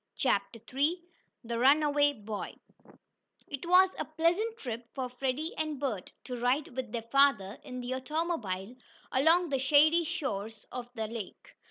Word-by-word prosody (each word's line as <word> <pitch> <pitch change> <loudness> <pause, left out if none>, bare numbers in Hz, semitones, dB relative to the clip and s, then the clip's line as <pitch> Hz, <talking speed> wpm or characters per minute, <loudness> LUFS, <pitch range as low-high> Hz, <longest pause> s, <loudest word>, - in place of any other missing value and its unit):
CHAPTER 230 - 0
III 300 +7 +2 0.4
THE 230 0 -3
RUNAWAY 290 +2 +4
BOY 215 -1 -5 0.9
It 285 +3 -6
was 370 +1 +6
a - - -1
pleasant 345 +9 0
trip 235 - -6
for 260 -2 -2
Freddie 265 +5 -2
and 310 -3 -3
Bert 240 -10 -3
to 250 - -5
ride 250 +5 +1
with 255 -4 -4
their 230 -1 -3
father 235 -4 +3
in 255 -2 -6
the 245 +1 -3
automobile 260 - -2 0.4
along 325 +6 +4
the 270 -2 0
shady 305 +5 +5
shores 225 - -4
of 245 -1 -6
the 220 - -2
lake. 230 - -8
270 Hz, 150 wpm, -30 LUFS, 235-310 Hz, 0.9 s, was